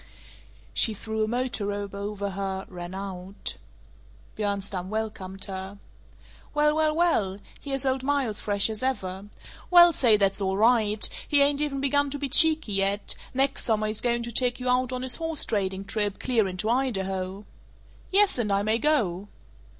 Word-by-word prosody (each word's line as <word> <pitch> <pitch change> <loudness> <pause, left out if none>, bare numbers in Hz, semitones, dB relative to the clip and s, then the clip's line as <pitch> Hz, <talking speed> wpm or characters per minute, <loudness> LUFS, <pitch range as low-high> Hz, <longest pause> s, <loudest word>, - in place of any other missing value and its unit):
She 220 - +3
threw 220 +1 -3
a - - 0
motor 240 -3 -2
robe 205 -1 -4
over 200 0 -4
her, 190 0 -4
ran 175 0 -8
out. 190 0 -6 0.8
Bjornstam 200 -3 -3
welcomed 205 -3 -4
her, 190 +1 -6 0.8
"Well, 300 0 +3
well, 310 -1 +1
well! 225 - +1 0.2
Here's 275 -2 -2
old 260 0 +1
Miles, 265 -6 -1
fresh 200 -1 +1
as 215 - -5
ever. 195 -7 -3 0.4
Well 345 -1 +8
say, 235 -7 +4
that's 195 0 +1
all 190 0 0
right; 215 -1 +4 0.2
he 285 -1 +6
ain't 285 0 +2
even 280 -2 -2
begun 285 +1 +2
to 285 - -4
be 280 -1 -4
cheeky 315 -4 +4
yet; 195 +1 +1 0.2
next 270 +1 +2
summer 215 -2 +1
he's 215 0 -1
going 240 -1 0
to 235 - -5
take 245 +1 +1
you 250 0 -2
out 250 0 +1
on 255 0 -4
his 260 -1 -1
horse 325 -2 -2
trading 195 -2 -2
trip, 205 0 -1
clear 230 -6 +1
into 185 +3 -3
Idaho." 195 -6 -1 0.6
"Yes, 395 -6 +3
and 210 -4 -1
I 200 0 +1
may 220 +2 +1
go!" 210 - +1
215 Hz, 165 wpm, -26 LUFS, 195-265 Hz, 0.8 s, Well